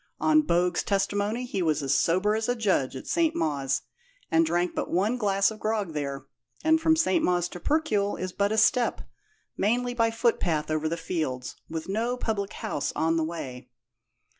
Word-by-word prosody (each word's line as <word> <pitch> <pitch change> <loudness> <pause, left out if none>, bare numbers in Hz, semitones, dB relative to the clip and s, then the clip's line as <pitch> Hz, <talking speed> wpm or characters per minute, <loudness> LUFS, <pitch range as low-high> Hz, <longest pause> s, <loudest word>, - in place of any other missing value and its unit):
On 310 0 +4
Bogue's 175 - +1
testimony 205 +4 0
he 200 -6 -3
was 155 -3 +1
as 135 0 +1
sober 185 +9 +2
as 220 +2 -1
a 245 - +2
judge 190 - 0
at 130 - -7
St. 330 -1 +1
Mawes, 140 -4 -1 0.5
and 165 0 +5
drank 175 +2 0
but - - -3
one 200 +7 +1
glass 200 -3 +2
of 215 - -9
grog 215 -6 -1
there, 140 -2 -4 0.4
and 320 0 +4
from 320 0 +4
St. 325 0 +2
Mawes 175 -1 +2
to 180 - -8
Percuil 215 - +1
is 185 0 -3
but 200 +2 +1
a 220 - 0
step, 235 +3 +3 0.6
mainly 245 +4 +1
by 230 -2 +2
footpath 180 -10 0
over 155 0 0
the 170 - -2
fields, 155 -7 -3
with 160 0 -5
no 230 +5 -1
public 210 -4 -2
house 145 0 -3
on 165 +1 +1
the 165 - +1
way." 130 -6 -6
195 Hz, 185 wpm, -27 LUFS, 160-225 Hz, 0.6 s, and